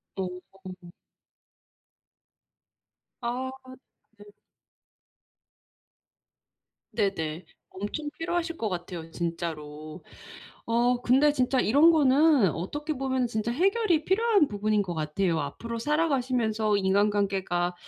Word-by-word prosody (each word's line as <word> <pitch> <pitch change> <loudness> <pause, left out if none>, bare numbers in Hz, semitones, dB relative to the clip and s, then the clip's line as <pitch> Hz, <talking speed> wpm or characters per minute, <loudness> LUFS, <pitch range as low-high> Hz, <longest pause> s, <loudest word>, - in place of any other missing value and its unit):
어. 185 -1 -8 2.3
아 250 +2 -2 0.7
네. 205 - -14 2.7
네네. 165 -4 -2 0.3
엄청 295 +10 -4
피로하실 335 0 -2
것 220 - -2
같아요 175 -2 -6
진짜로. 155 -3 -5 0.6
어 240 +2 +1
근데 275 +4 +4
진짜 255 -1 +1
이런 290 +10 +5
거는 290 - +4
어떻게 295 - -4
보면 260 -2 -1
진짜 225 0 -2
해결이 370 - +1
필요한 405 -4 +3
부분인 210 0 0
것 180 -3 -3
같아요. 160 +2 -1
앞으로 230 +11 -5
살아가시면서 245 -7 +1
인간관계가 195 -3 +1
220 Hz, 205 characters per minute, -27 LUFS, 185-285 Hz, 2.7 s, 이런